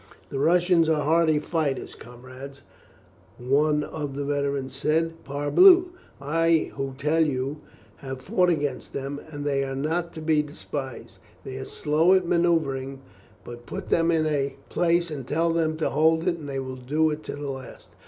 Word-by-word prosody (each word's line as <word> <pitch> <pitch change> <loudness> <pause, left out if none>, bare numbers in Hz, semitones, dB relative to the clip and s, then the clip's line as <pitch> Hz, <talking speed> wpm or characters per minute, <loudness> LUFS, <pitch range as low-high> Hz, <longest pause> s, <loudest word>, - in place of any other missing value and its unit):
"The 135 - -3
Russians 170 +2 +3
are 155 -2 +2
hardy 160 0 +3
fighters, 150 -3 -2
comrades," 130 +3 -12 0.7
one 150 +4 +2
of 145 -3 -5
the 145 - -3
veterans 140 -2 -2
said. 165 +3 -1
"Parbleu! 350 - +5 0.3
I 165 +3 +1
who 135 -1 -4
tell 155 +4 +2
you, 140 0 -2 0.4
have 135 -1 -7
fought 180 - +1
against 145 -4 -2
them, 140 +1 -4
and 145 -2 -6
they 140 -1 +1
are 135 0 -4
not 165 +5 -2
to 160 - -7
be 155 -1 +3
despised. 145 -3 -7 0.2
They 130 -1 -7
are 130 - -5
slow 160 +5 +2
at 185 -1 +2
manuoevring, 155 -6 +1 0.5
but 120 0 -10
put 195 0 -6
them 165 0 +3
in 160 -2 +2
a 140 -3 -1
place 170 -1 +1
and 135 -4 -6
tell 165 +2 +1
them 160 -1 0
to 160 - -1
hold 160 +3 +2
it, 170 -2 0
and 145 -2 -8
they 135 - -3
will 130 -1 -6
do 150 +5 +1
it 150 +1 -4
to - - -5
the 145 -1 -4
last. 130 -2 -10
150 Hz, 175 wpm, -25 LUFS, 135-165 Hz, 0.7 s, Parbleu